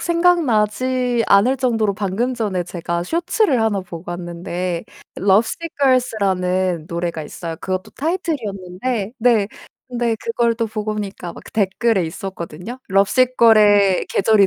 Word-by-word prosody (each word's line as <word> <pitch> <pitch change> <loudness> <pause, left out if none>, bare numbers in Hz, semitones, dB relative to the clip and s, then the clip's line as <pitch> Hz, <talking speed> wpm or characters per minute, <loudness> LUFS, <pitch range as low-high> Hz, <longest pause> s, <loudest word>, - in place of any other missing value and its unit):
생각나지 255 -8 +2
않을 230 +7 +4
정도로 225 -5 +1
방금 205 +5 -1
전에 200 -6 -1
제가 170 0 -3
쇼츠를 335 - +1
1 220 -3 +1
보고 170 -2 -9
왔는데 175 0 -4 0.3
Lovesick 220 - +2
Girls 255 -2 +3
라는 185 -3 0
노래가 170 -1 -3
있어요. 165 +2 -6
그것도 185 0 -3
타이틀이었는데 230 - -3
네. 225 -4 +3 0.4
근데 240 -2 -1
그걸 230 0 +1
또 230 0 -1
보고 215 0 -3
오니까 195 -4 -5
막 - - -12
댓글에 205 -1 +1
있었거든요. 185 +5 -7
"Lovesick 245 +6 +3
Girls의 205 -4 +5
계절이 200 -1 +4
210 Hz, 380 characters per minute, -20 LUFS, 185-245 Hz, 0.4 s, Girls의